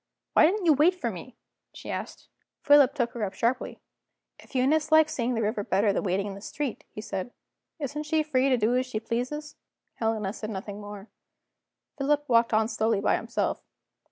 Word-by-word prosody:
"Why - - +7
didn't 390 +2 -1
you 320 - +6
wait 310 +6 +4
for 240 -10 -3
me?" 215 +7 -10 0.4
she - - -7
asked. - - -6 0.4
Philip 285 -2 +6
took 240 -5 0
her 235 - -4
up 190 -2 -3
sharply. 245 +5 -1 0.6
"If - - -17
Eunice 300 +5 +2
likes 315 0 +5
seeing 245 0 -1
the 225 - 0
river 210 0 -1
better 200 +1 +2
than - - 0
waiting 195 0 0
in 200 - -5
the 195 - -10
street," 270 +3 -4
he 215 - -8
said, 195 0 -4 0.5
"isn't 295 +1 -4
she 315 0 +2
free 275 -3 +1
to 255 - +3
do 230 +2 +2
as 255 +1 0
she 225 -4 -3
pleases?" 255 +7 -4 0.4
Helena 220 -3 -1
said 215 -1 -6
nothing 205 0 -6
more; 205 0 -9 0.9
Philip 290 +1 +1
walked 230 -1 +3
on 220 0 +3
slowly 220 -2 0
by - - +2
himself. - - -2
240 Hz, 190 wpm, -27 LUFS, 215-290 Hz, 0.9 s, Why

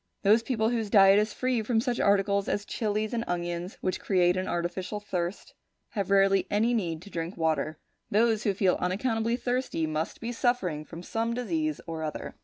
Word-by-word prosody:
Those 215 +3 +5
people 225 -2 0
whose 225 -3 -1
diet 195 -1 +7
is 210 +1 0
free 255 -1 0
from 225 +1 +1
such 240 +1 -1
articles 200 0 +2
as 205 - -1
chillies 215 +1 -2
and 230 -1 0
onions 175 +1 -3
which 185 - -1
create 180 -2 +2
an 185 0 -2
artificial 175 +4 -3
thirst, 180 -2 -4 0.4
have 200 -4 -3
rarely 195 0 +4
any 225 +4 +2
need 170 -7 -2
to 200 - -13
drink 165 +2 -4
water. 160 -1 0 0.3
Those 220 +1 +3
who 205 -5 0
feel 185 -2 +2
unaccountably 225 +5 0
thirsty 250 -10 -1
must 155 +1 -3
be 230 +1 -4
suffering 230 - 0
from 170 +2 -9
some 230 +4 -2
disease 310 +5 -2
or 165 -1 -5
other. 155 -1 -5
200 Hz, 185 wpm, -28 LUFS, 175-230 Hz, 0.4 s, diet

